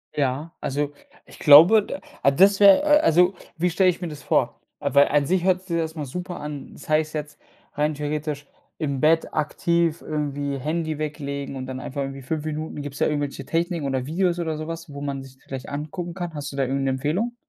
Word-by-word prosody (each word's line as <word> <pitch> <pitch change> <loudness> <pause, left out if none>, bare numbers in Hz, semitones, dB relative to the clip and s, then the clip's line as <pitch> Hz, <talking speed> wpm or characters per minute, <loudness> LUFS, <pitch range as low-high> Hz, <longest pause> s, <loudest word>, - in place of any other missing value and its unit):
Ja, 145 +3 -1
also 145 +1 -2 0.3
ich - - -16
glaube, 165 +9 +8
d 280 - -6 0.4
das 195 +1 +6
wäre 200 +5 +8
äh, 295 0 +5
also 180 - +4 0.2
wie 175 +2 +1
stelle 185 +2 +4
ich 180 - -1
mir 175 - -4
das 150 -2 -9
vor? - - 0 0.2
Weil 140 0 +4
an 145 -1 +2
sich 180 +3 +1
hört 185 -1 +2
sich 185 - -21
das 170 - 0
erst 160 0 -3
mal 150 -2 -4
super 180 +6 -6
an 150 -2 -7
das - - -13
heißt 155 0 +1
jetzt 150 0 -5 0.3
rein 150 +1 0
theoretisch 150 0 -3 0.3
im 140 -4 -2
Bett 160 +1 +3
aktiv 165 +2 0
irgendwie 145 -2 -2
Handy 155 +2 -2
weglegen 140 -2 -4
und 130 -1 -5
dann 130 0 -6
einfach 140 +2 -5
irgendwie 135 0 -5
5 150 +4 -3
Minuten 155 -1 -4
gibt's 145 -1 -7
da - - +3
irgendwelche 145 -2 -3
Techniken 165 -3 -1
oder 130 -1 -1
Videos 175 +3 0
oder 160 -2 -2
sowas, 165 0 -6
wo 140 - -7
man 140 -1 -4
sich 130 0 -15
vielleicht 135 -1 -7
angucken 155 +4 -5
kann? 175 -2 -5
Hast 145 -1 -5
du 140 - -9
da - - +1
irgend 135 +1 -1
'ne 135 - +1
Empfehlung? 160 - -1
150 Hz, 215 wpm, -24 LUFS, 140-170 Hz, 0.4 s, glaube